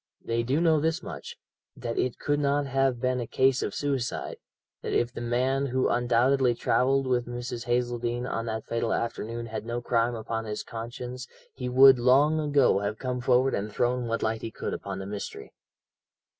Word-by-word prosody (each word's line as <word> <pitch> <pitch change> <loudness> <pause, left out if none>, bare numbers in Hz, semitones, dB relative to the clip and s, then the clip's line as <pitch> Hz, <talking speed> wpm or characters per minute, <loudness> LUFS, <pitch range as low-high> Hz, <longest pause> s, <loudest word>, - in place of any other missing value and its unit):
They 115 0 0
do 130 +6 0
know 165 -2 +4
this 165 +3 -1
much, - - -8 0.4
that 115 -1 -3
it 125 -2 -1
could 145 -1 0
not 145 0 +1
have 135 -2 +1
been 125 0 0
a 120 - -4
case 130 +2 +2
of - - -3
suicide, 135 -4 -2 0.4
that - - -4
if 120 0 +1
the - - -6
man 130 +3 0
who 130 0 +1
undoubtedly 125 +1 +3
travelled 135 +3 +2
with 125 -2 0
Mrs. 120 0 -5
Hazeldene 120 0 -1
on 115 -1 -3
that 110 -1 -3
fatal 115 -1 -1
afternoon 115 0 -3
had 110 -2 -5
no 120 +1 -3
crime 120 0 +1
upon 115 0 -4
his 105 -1 -4
conscience 125 +2 -7 0.3
he 125 -1 -4
would 130 0 +7
long 140 +6 +4
ago 145 -8 +3
have 100 +2 -3
come 125 0 -3
forward 125 +2 +3
and 105 +2 -2
thrown 120 +2 0
what 115 0 -1
light 110 0 -1
he 115 - -4
could - - -5
upon 100 -1 -5
the 95 - -6
mystery. 100 0 -7
120 Hz, 185 wpm, -27 LUFS, 115-130 Hz, 0.4 s, would